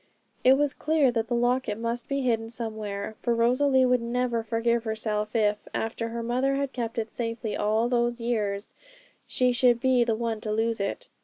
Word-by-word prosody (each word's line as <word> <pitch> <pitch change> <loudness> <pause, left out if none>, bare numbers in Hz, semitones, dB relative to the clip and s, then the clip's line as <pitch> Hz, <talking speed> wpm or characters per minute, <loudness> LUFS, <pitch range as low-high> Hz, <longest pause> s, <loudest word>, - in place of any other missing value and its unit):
It 260 +1 +6
was 290 -1 +1
clear 305 -4 +2
that 230 -1 -1
the 240 - -1
locket 240 -2 +1
must 230 +1 -2
be 275 -1 -1
hidden 225 -2 0
somewhere, 220 -3 -5
for 235 -1 0
Rosalie 260 +3 +3
would 250 -1 +3
never 240 0 -1
forgive 230 +1 0
herself 215 -1 -2
if, 210 -2 +1
after 225 +1 -2
her 230 0 -4
mother 255 +4 +1
had 275 -1 -2
kept 235 -2 -4
it 220 -1 -2
safely 230 -2 -3
all 220 +3 +1
those 240 0 0
years, 210 -4 -2 0.5
she 250 -1 +2
should 245 -1 +3
be 255 -1 +3
the 230 -2 0
one 225 -1 -3
to 215 - -3
lose 225 +1 0
it. 200 0 -3
235 Hz, 185 wpm, -27 LUFS, 225-250 Hz, 0.5 s, It